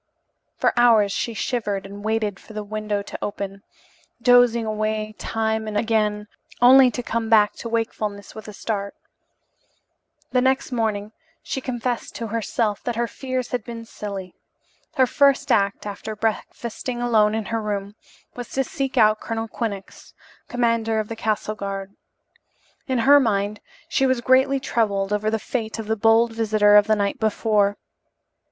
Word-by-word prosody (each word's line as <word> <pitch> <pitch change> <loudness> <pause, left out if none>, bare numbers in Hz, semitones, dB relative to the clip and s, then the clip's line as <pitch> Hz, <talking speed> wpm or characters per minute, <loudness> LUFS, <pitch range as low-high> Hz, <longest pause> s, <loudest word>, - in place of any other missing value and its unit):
For - - +2
hours 225 -4 +5
she 230 +3 -2
shivered 205 -4 -2
and 200 +1 -9
waited 215 -2 -1
for 220 - -14
the 210 0 -4
window 210 -1 -3
to - - -8
open, 200 -1 -5 0.6
dozing 245 -1 +5
away 215 0 -2
time 220 -1 -1
and 210 -1 -2
again 210 -1 0 0.3
only 255 +1 +8
to 245 0 -5
come 230 -1 -2
back 210 -2 +5
to 230 - -6
wakefulness 215 -3 -3
with 220 - -10
a - - -7
start. 200 -1 -4 1.4
The 250 - +3
next 265 +1 +1
morning 215 -3 -1 0.3
she 265 - -4
confessed 245 -1 -3
to 230 - -4
herself 220 -1 -1
that 240 - -2
her 235 +1 0
fears 255 0 -4
had 245 -3 -2
been 230 -1 -8
silly. 200 -5 -7 0.6
Her 260 - +5
first 280 +1 +3
act 200 -2 +1
after 210 +1 -6
breakfasting 225 +3 -3
alone 220 -3 +3
in 220 -1 -2
her 225 - 0
room 205 -1 -3 0.4
was 245 -2 -7
to 270 - +1
seek 270 -1 -4
out 215 -2 +5
Colonel 225 0 -3
Quinnox, 205 -4 -6 0.3
commander 230 -2 +1
of 215 - -3
the 225 - -4
castle 215 -1 -1
guard. 195 -1 -6 0.9
In 260 -2 0
her 285 +1 +8
mind 205 -4 0 0.3
she 270 - +2
was 260 -1 +1
greatly 265 +2 +3
troubled 205 -6 0
over 210 +1 0
the 220 - 0
fate 220 0 -4
of 225 - -5
the 220 +1 0
bold 225 +1 +3
visitor 215 -2 +3
of 205 0 +6
the 215 - +4
night 200 -1 -1
before. 210 -2 +1
220 Hz, 160 wpm, -23 LUFS, 210-240 Hz, 1.4 s, only